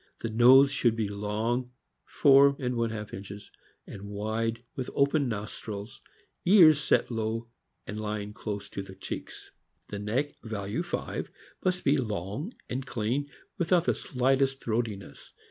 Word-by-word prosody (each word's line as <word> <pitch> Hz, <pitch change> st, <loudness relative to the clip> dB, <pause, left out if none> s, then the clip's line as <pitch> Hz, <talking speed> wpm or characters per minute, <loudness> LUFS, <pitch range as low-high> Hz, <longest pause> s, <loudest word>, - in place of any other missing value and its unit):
The 115 Hz, -, -2 dB
nose 130 Hz, +5 st, +7 dB
should 120 Hz, -5 st, +2 dB
be 110 Hz, -2 st, -1 dB
long 110 Hz, +5 st, -2 dB, 0.3 s
(four 140 Hz, 0 st, +6 dB
and 125 Hz, -2 st, -2 dB
one 115 Hz, -1 st, 0 dB
half 105 Hz, -1 st, -6 dB
inches) 100 Hz, +1 st, -8 dB, 0.3 s
and 100 Hz, 0 st, -9 dB
wide, 110 Hz, +3 st, -2 dB
with 130 Hz, -, -4 dB
open 140 Hz, -1 st, +2 dB
nostrils. 105 Hz, 0 st, -6 dB, 0.4 s
Ears 170 Hz, -6 st, +7 dB
set 135 Hz, -, +2 dB
on 115 Hz, -, -3 dB
low 115 Hz, +1 st, -2 dB, 0.4 s
and 105 Hz, -, -5 dB
lying 105 Hz, -1 st, -4 dB
close 105 Hz, -1 st, -5 dB
to -, -, -5 dB
the 95 Hz, -1 st, -10 dB
cheeks. 95 Hz, -, -7 dB, 0.4 s
The 100 Hz, -, -5 dB
neck 120 Hz, +8 st, -1 dB
(value 105 Hz, -3 st, -3 dB
5) -, -, -4 dB, 0.3 s
must 180 Hz, -1 st, 0 dB
be 145 Hz, +2 st, +4 dB
long 110 Hz, -, -3 dB, 0.2 s
and 130 Hz, +2 st, -3 dB
clean, 125 Hz, +3 st, -2 dB, 0.3 s
without 175 Hz, 0 st, +3 dB
the -, -, +3 dB
slightest 135 Hz, +1 st, +1 dB
throatiness. 110 Hz, -3 st, -4 dB
115 Hz, 145 wpm, -28 LUFS, 105-135 Hz, 0.4 s, nose